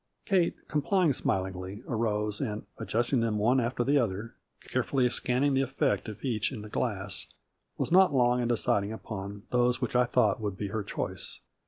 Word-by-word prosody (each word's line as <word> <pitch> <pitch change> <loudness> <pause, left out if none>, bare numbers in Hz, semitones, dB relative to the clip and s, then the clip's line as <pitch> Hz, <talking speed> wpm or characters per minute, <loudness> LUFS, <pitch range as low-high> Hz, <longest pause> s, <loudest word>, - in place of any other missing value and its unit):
Kate, 185 -4 +2
complying 160 +1 +2
smilingly, 95 -1 -2
arose, 105 -1 -1
and, 110 -5 -3
adjusting 120 +3 0
them 115 -2 0
one 120 +5 +3
after 120 0 0
the 140 +3 +3
other, 110 -1 -2 0.3
carefully 130 -3 +1
scanning 130 +4 +2
the 135 - +3
effect 135 -2 0
of 110 +5 -8
each 115 -3 0
in 110 -6 -6
the 105 - -9
glass, 100 -4 -1 0.5
was - - -1
not 185 -1 +6
long 125 -2 +3
in 120 - 0
de 120 - +2
ciding 100 0 +1
upon 100 -2 -6
those 125 0 +2
which 125 -1 -3
I 125 0 +5
thought 110 -3 +2
would 100 -3 -3
be 100 -1 -3
her 110 +2 -2
choice. 100 - -5
115 Hz, 180 wpm, -29 LUFS, 105-130 Hz, 0.5 s, not